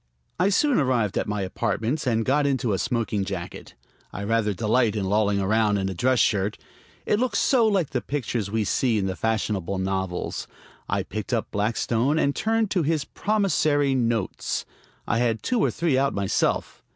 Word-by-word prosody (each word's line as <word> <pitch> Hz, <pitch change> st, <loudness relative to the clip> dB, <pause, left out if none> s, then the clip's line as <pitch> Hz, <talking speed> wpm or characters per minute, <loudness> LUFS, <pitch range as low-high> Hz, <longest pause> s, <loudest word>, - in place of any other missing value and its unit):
I 185 Hz, +2 st, +3 dB
soon 275 Hz, -, +3 dB
arrived 125 Hz, -8 st, +1 dB
at -, -, -1 dB
my 105 Hz, -1 st, -2 dB
apartments, 115 Hz, +9 st, -2 dB
and 115 Hz, -2 st, +1 dB
got 145 Hz, +2 st, +2 dB
into 130 Hz, -6 st, 0 dB
a 95 Hz, -, -1 dB
smoking 110 Hz, -5 st, -1 dB
jacket. -, -, -6 dB, 0.4 s
I 100 Hz, -, -6 dB
rather 110 Hz, 0 st, +1 dB
delight 110 Hz, +2 st, +1 dB
in 100 Hz, -2 st, -1 dB
lolling 100 Hz, 0 st, +2 dB
around 105 Hz, +1 st, +2 dB
in 95 Hz, -1 st, -1 dB
a -, -, -3 dB
dress 125 Hz, +7 st, +1 dB
shirt; 105 Hz, -2 st, +1 dB, 0.5 s
it 210 Hz, -, +1 dB
looks 255 Hz, 0 st, 0 dB
so 240 Hz, -4 st, +3 dB
like 195 Hz, -8 st, +1 dB
the 125 Hz, -, -1 dB
pictures 120 Hz, -7 st, -3 dB
we 110 Hz, +1 st, 0 dB
see 115 Hz, +2 st, +1 dB
in 100 Hz, -, 0 dB
the 95 Hz, -1 st, -2 dB
fashionable 105 Hz, -4 st, -1 dB
novels. 95 Hz, -1 st, -3 dB, 0.4 s
I -, -, 0 dB
picked 110 Hz, +4 st, -5 dB
up 115 Hz, -, -1 dB
Blackstone 115 Hz, +6 st, 0 dB
and 140 Hz, -3 st, +1 dB
turned 225 Hz, -1 st, 0 dB
to 185 Hz, -, +2 dB
his 155 Hz, -1 st, 0 dB
"promissory 155 Hz, -9 st, +1 dB
notes." 115 Hz, -5 st, -1 dB, 0.4 s
I 115 Hz, -, 0 dB
had 115 Hz, -2 st, 0 dB
two 245 Hz, -, 0 dB
or -, -, +3 dB
three 160 Hz, -6 st, +1 dB
out 140 Hz, 0 st, +1 dB
myself. 100 Hz, -1 st, -1 dB
115 Hz, 180 wpm, -25 LUFS, 105-145 Hz, 0.5 s, I